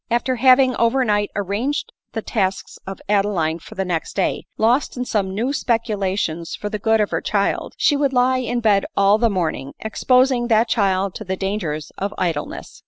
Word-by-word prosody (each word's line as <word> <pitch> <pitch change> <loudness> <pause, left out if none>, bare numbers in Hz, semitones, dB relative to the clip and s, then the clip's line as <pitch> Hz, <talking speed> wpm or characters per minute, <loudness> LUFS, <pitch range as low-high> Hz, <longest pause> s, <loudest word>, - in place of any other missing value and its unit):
After 240 +2 0
having 255 +1 +5
over 250 +3 +2
night 205 -2 +1
arranged 205 - -2 0.2
the 225 - -3
tasks 190 -4 -2
of 195 - -6
Adeline 195 -6 +1
for - - -13
the 190 - -2
next 170 -3 -3
day 190 - -1
— - - -50
lost 250 +3 +1
in 250 - -2
some 205 -5 -1
new 235 +5 0
specu 235 -5 0
lations 185 -5 -2
for 210 - -5
the 210 - -4
good 220 +1 +2
of 210 - 0
her - - -1
child, 200 -1 -1
she 290 - +3
would 280 -1 +1
lie 255 0 +2
in 245 -1 -2
bed 205 -3 +3
all 200 +2 +4
the 230 0 +3
morning, 160 -8 -2
exposing 250 +2 +2
that 225 0 +3
child 195 -3 +1
to - - -7
the 190 -1 -3
dangers 185 -7 -3
of 200 +2 -3
idle 165 -5 -1
ness. - - -10
210 Hz, 200 wpm, -21 LUFS, 190-245 Hz, 0.2 s, having